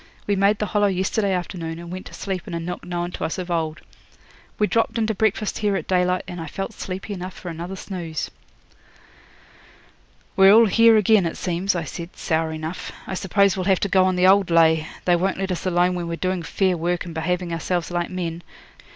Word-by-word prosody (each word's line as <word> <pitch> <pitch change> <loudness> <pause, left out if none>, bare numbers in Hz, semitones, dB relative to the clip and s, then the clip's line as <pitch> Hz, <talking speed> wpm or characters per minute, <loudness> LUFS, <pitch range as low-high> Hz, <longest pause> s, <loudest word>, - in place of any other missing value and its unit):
We 205 - +1
made 200 +2 +3
the 210 - -1
Hollow 205 0 +2
yesterday 195 +2 0
afternoon, 175 -3 -3
and 170 0 -9
went 185 +1 -6
to - - -13
sleep 190 -3 -4
in - - -4
a - - -2
nook 175 +2 -5
known 175 0 -3
to - - -6
us 160 - -2
of 180 -1 -5
old. 160 -2 -1 0.8
We 210 - +3
dropped 230 +2 0
in 225 - +2
to 220 - 0
breakfast 215 0 0
here 205 -2 +1
at - - -3
daylight, 180 0 +1
and 175 -2 -6
I 160 - -6
felt 195 +7 -5
sleepy 195 +1 -5
enough 185 -1 -6
for 180 - -7
another 170 +3 -6
snooze.' 175 -5 -5 2.0
'We're 195 0 +7
all 230 +1 +8
here 230 +2 +6
again, 210 -3 +4
it 165 - -5
seems,' 180 +2 -1
I 170 - -1
said, 170 +2 -7
sour 160 -1 0
enough. 160 +2 -5
'I - - -5
suppose 200 0 +2
we'll 185 -2 -3
have 190 -2 +3
to 200 - 0
go 190 0 +4
on 185 0 +1
the 180 0 +3
old 195 0 +5
lay; 160 -1 +4 0.2
they 175 - +4
won't 190 +3 0
let 190 0 -2
us 180 +1 -3
alone 180 0 +2
when 175 -1 -3
we're 170 - -2
doing 185 +1 -1
fair 185 +2 +1
work 175 +1 -1
and 170 - -7
behaving 175 +2 -2
ourselves 175 +1 -2
like 175 0 -1
men. 175 -2 -4
180 Hz, 220 wpm, -23 LUFS, 170-195 Hz, 2.0 s, all